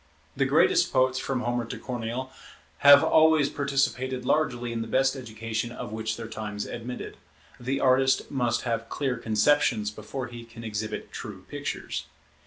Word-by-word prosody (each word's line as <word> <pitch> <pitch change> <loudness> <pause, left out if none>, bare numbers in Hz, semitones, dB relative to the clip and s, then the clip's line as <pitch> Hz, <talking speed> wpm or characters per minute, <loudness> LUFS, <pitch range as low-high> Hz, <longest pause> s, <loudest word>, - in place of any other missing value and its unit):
The - - +2
greatest - - +4
poets, 130 0 +2
from 130 -2 -2
Homer 120 -1 -1
to 115 - -6
Corneille, 125 +1 -4 0.5
have 145 0 +9
always 155 -2 +5
participated 135 -2 -1
largely 125 -5 0
in 115 - -2
the 115 - -4
best 135 +3 +2
education 115 -2 -4
of 120 - -7
which 110 0 -3
their 115 -1 -6
times 105 -2 -5
admitted. 120 +1 -6 0.4
The 130 +3 -2
artist 130 0 +3
must 120 -3 0
have 115 -1 -2
clear 135 -3 -1
conceptions 110 -1 +2
before 110 +5 -6
he 120 -1 -9
can 115 0 -12
exhibit 110 -1 -4
true 100 -5 -8
pictures. 145 0 -4
120 Hz, 155 wpm, -27 LUFS, 115-135 Hz, 0.5 s, have